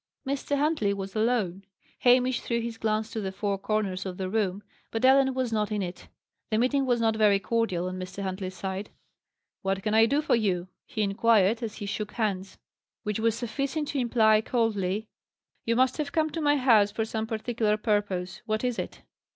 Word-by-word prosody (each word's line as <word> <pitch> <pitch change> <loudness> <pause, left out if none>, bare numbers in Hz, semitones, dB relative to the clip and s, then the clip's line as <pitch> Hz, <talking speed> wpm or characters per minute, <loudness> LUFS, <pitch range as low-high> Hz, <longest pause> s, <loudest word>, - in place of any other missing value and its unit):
Mr. 280 +1 -1
Huntley 280 -9 +1
was 195 +1 -6
alone. 215 -5 0 0.4
Hamish 250 0 +4
threw 235 -1 -1
his 230 -1 -5
glance 220 0 -1
to 220 - -3
the 190 -1 -3
four 200 0 -2
corners 195 -2 -1
of 185 -2 -5
the 185 -1 -3
room, 205 -2 0 0.3
but 225 +3 0
Ellen 265 0 +5
was 255 -3 -1
not 210 -1 0
in 210 -2 0
it. 180 0 -7 0.4
The 215 - +1
meeting 265 +3 +2
was 245 -1 +2
not 225 -1 +2
very 210 -2 +4
cordial 195 -5 -1
on 185 0 -5
Mr. 185 +2 -6
Huntley's 185 0 -4
side. 190 +1 -4 0.7
"What 195 0 -1
can 215 - 0
I 225 +1 +6
do 285 +5 +1
for - - +1
you?" 185 -5 0 0.2
he 215 - -1
inquired, 215 +1 +3
as 225 -3 -4
he 205 - -6
shook 210 +1 -4
hands. 195 -4 -2 0.5
Which 210 0 -2
was 225 0 +2
sufficient 275 +6 -2
to 285 - -1
imply 220 -3 +4
coldly, 215 -3 0 0.6
"You 230 - +1
must 255 +1 +3
have 295 -2 -2
come 315 0 +1
to 325 - -3
my 290 -1 +3
house 225 -6 +5
for 220 +1 -1
some 220 0 -3
particular 220 -1 0
purpose. 205 -4 -1
What 215 +1 -1
is 245 -2 -1
it?" - - -6
220 Hz, 195 wpm, -27 LUFS, 195-240 Hz, 0.7 s, I